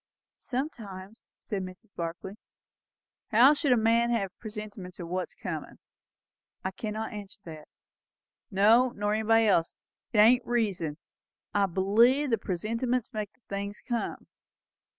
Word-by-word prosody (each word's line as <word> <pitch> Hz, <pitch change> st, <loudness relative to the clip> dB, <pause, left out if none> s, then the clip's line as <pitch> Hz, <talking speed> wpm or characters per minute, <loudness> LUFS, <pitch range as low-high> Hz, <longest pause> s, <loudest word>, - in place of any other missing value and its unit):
"Sometimes," 225 Hz, -7 st, -5 dB
said 205 Hz, -3 st, -4 dB
Mrs. 185 Hz, +3 st, -10 dB
Barclay. 170 Hz, +3 st, -5 dB, 0.9 s
"How 245 Hz, +6 st, +7 dB
should 290 Hz, -2 st, 0 dB
a 245 Hz, -, +6 dB
man 230 Hz, +1 st, +3 dB
have 200 Hz, -6 st, -1 dB
presentiments 210 Hz, -4 st, -8 dB
o' 175 Hz, -, -5 dB
what's 180 Hz, +2 st, -3 dB
comin'?" -, -, -6 dB, 0.9 s
"I 190 Hz, -, 0 dB
cannot 215 Hz, +3 st, -4 dB
answer 205 Hz, -2 st, -8 dB
that." 155 Hz, -4 st, -10 dB, 0.8 s
"No, 225 Hz, +5 st, +5 dB
nor 205 Hz, +1 st, 0 dB
nobody 225 Hz, +1 st, +4 dB
else. 170 Hz, -5 st, +2 dB, 0.4 s
It -, -, -1 dB
ain't 235 Hz, +4 st, +6 dB
reason. 200 Hz, -11 st, -1 dB, 0.6 s
I 200 Hz, -1 st, +3 dB
believe 230 Hz, +10 st, +3 dB
the 225 Hz, -, +2 dB
presentiments 230 Hz, +6 st, -2 dB
makes 215 Hz, -1 st, -4 dB
the 255 Hz, -, -37 dB
things 200 Hz, +1 st, -5 dB
come." 240 Hz, -2 st, -3 dB
210 Hz, 130 wpm, -29 LUFS, 190-235 Hz, 0.9 s, How